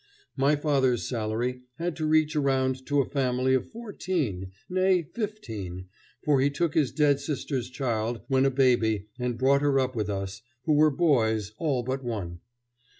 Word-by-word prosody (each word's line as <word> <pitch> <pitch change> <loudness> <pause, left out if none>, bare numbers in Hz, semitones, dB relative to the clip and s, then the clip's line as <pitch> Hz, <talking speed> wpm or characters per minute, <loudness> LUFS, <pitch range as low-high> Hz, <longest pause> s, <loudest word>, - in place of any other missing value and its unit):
My 140 +3 +3
father's 135 -5 +1
salary 120 +2 -2
had 170 -1 -3
to 155 -2 -1
reach 155 0 +3
around 130 -2 0
to 145 0 +3
a - - -1
family 130 -1 +1
of 130 - 0
fourteen, 170 - -3 0.2
nay, 185 -1 +2
fifteen, 110 - -6 0.3
for 145 -3 +3
he 140 - +3
took 155 +2 -1
his 150 -6 +2
dead 145 -2 +3
sister's 135 -4 -3
child 120 -3 -2
when 135 -1 +3
a 135 - +4
baby 115 -6 +2
and 125 -1 -2
brought 135 +3 +3
her 140 -2 +3
up 130 -1 -1
with 105 -2 -1
us, 100 0 -4 0.2
who 155 - +2
were 155 +1 +5
boys 110 - +1
all 140 -7 0
but 130 +2 -3
one. 95 -8 -4
130 Hz, 165 wpm, -27 LUFS, 115-150 Hz, 0.3 s, were